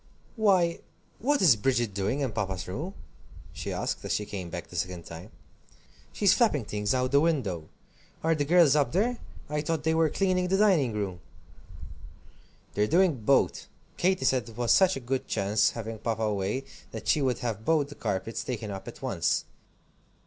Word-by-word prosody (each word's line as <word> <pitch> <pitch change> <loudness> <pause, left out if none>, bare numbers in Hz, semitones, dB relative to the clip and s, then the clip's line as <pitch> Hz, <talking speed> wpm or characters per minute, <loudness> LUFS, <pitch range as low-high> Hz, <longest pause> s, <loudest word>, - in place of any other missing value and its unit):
"Why 190 -7 +3 0.4
what 285 +1 +1
is 150 -10 +7
Bridget 120 -1 0
doing 105 +8 -1
in 135 -4 -1
Papa's 95 -5 -3
room?" 155 - -5 0.6
she - - -5
asked, - - -3
as - - -4
she 105 - 0
came 95 -4 -6
back 85 0 -6
the - - -13
second 90 0 -3
time. 85 +5 -9 0.8
"She's 200 -2 +4
flapping 180 - +2
things 105 +3 -1
out 125 0 +1
of 130 - -4
the 140 - +5
window. 110 - -1 0.5
Are 165 +1 +3
the 150 -2 0
girls 160 -2 +5
up 140 -5 +1
there? 235 +7 +1 0.3
I 150 0 -2
thought 160 0 -2
they 160 +1 +2
were 160 -1 +3
cleaning 185 0 +1
the 190 +1 +2
dining 185 - +3
room." 100 -4 -3 1.5
"They're 105 +1 +1
doing 175 - +3
both. 135 +5 +2 0.3
Katy 185 -6 +1
said 125 -4 +1
it 110 - -13
was 120 -1 +1
such 190 -1 +5
a - - -4
good 130 +1 -3
chance, 105 +2 +2
having 110 -1 -5
Papa 110 0 -2
away, 105 +4 -1 0.3
that - - -8
she 150 - +3
would 130 -3 +1
have 110 -2 -3
both 150 0 +2
the - - -8
carpets 110 -3 -3
taken 110 -4 -4
up 95 -1 -7
at - - -10
once. - - 0
130 Hz, 185 wpm, -28 LUFS, 105-165 Hz, 1.5 s, is